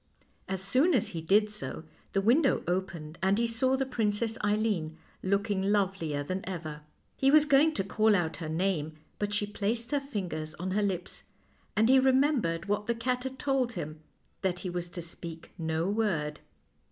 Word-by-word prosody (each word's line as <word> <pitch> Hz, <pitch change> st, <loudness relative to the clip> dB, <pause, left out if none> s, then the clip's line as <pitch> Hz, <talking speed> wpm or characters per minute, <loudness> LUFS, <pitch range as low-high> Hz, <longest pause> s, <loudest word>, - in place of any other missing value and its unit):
As 190 Hz, 0 st, -3 dB
soon 265 Hz, -, +3 dB
as 235 Hz, -, +1 dB
he 165 Hz, -, -5 dB
did 210 Hz, +6 st, +3 dB
so, 210 Hz, -6 st, -5 dB, 0.3 s
the 195 Hz, -, +2 dB
window 260 Hz, +7 st, +3 dB
opened 170 Hz, -3 st, -3 dB
and 190 Hz, +2 st, +3 dB
he 235 Hz, -, +2 dB
saw 245 Hz, +3 st, +2 dB
the 270 Hz, -, 0 dB
Princess 225 Hz, -2 st, 0 dB
Eileen, 205 Hz, -7 st, 0 dB, 0.2 s
looking 200 Hz, +1 st, 0 dB
lovelier 190 Hz, -7 st, 0 dB
than 185 Hz, +6 st, -3 dB
ever. 155 Hz, -5 st, -5 dB, 0.3 s
He 270 Hz, -, +3 dB
was 305 Hz, +1 st, +6 dB
going 300 Hz, +2 st, +4 dB
to 195 Hz, -, 0 dB
call 215 Hz, +2 st, +3 dB
out 170 Hz, -4 st, 0 dB
her 160 Hz, -2 st, -5 dB
name, 160 Hz, -2 st, 0 dB, 0.3 s
but 205 Hz, 0 st, -1 dB
she 205 Hz, 0 st, 0 dB
placed 220 Hz, +4 st, -2 dB
her 290 Hz, -, +2 dB
fingers 180 Hz, -, -4 dB
on 185 Hz, +2 st, -4 dB
her 210 Hz, +3 st, +1 dB
lips, 190 Hz, -3 st, -3 dB, 0.5 s
and 220 Hz, +1 st, +4 dB
he 265 Hz, +1 st, +7 dB
remembered 260 Hz, -, +2 dB
what 205 Hz, +1 st, -1 dB
the 235 Hz, -, +1 dB
cat 250 Hz, +2 st, -1 dB
had 265 Hz, 0 st, -4 dB
told 265 Hz, -3 st, 0 dB
him, 155 Hz, -5 st, -5 dB, 0.4 s
that 180 Hz, -2 st, -1 dB
he 180 Hz, -, -3 dB
was 175 Hz, 0 st, -4 dB
to 175 Hz, -1 st, -5 dB
speak 165 Hz, 0 st, -9 dB
no 160 Hz, +1 st, 0 dB
word. 185 Hz, -8 st, 0 dB
200 Hz, 180 wpm, -30 LUFS, 170-235 Hz, 0.5 s, he